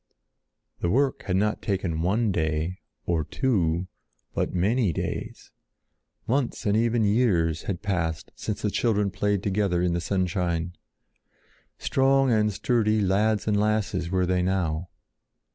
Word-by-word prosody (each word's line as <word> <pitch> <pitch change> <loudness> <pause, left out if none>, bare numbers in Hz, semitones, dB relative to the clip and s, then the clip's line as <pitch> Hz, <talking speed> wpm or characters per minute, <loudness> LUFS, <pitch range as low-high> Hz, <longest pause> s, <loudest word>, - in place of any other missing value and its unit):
The 85 - 0
work 135 +6 +1
had 90 - +1
not 105 +2 +1
taken 95 -5 -1
one 105 +5 +1
day, 80 +1 -1 0.3
or 85 -3 0
two, 90 - 0 0.5
but - - -1
many 100 +3 +1
days. - - -5 0.7
Months 125 0 -1
and 105 0 +2
even 115 0 +2
years 100 -8 +2
had 90 -1 -3
passed 80 -6 -2
since 105 - -4
the 105 - +1
children 105 -4 +1
played 100 0 0
together 100 -3 +1
in 90 0 +1
the 85 - -1
sunshine. 90 -2 -1 1.0
Strong 135 0 +2
and 105 -1 +3
sturdy 110 +2 +1
lads 105 +2 +1
and 105 -1 +2
lasses 105 -5 0
were 90 0 +1
they 90 0 +1
now. 90 -2 -1
95 Hz, 135 wpm, -26 LUFS, 90-110 Hz, 1.0 s, and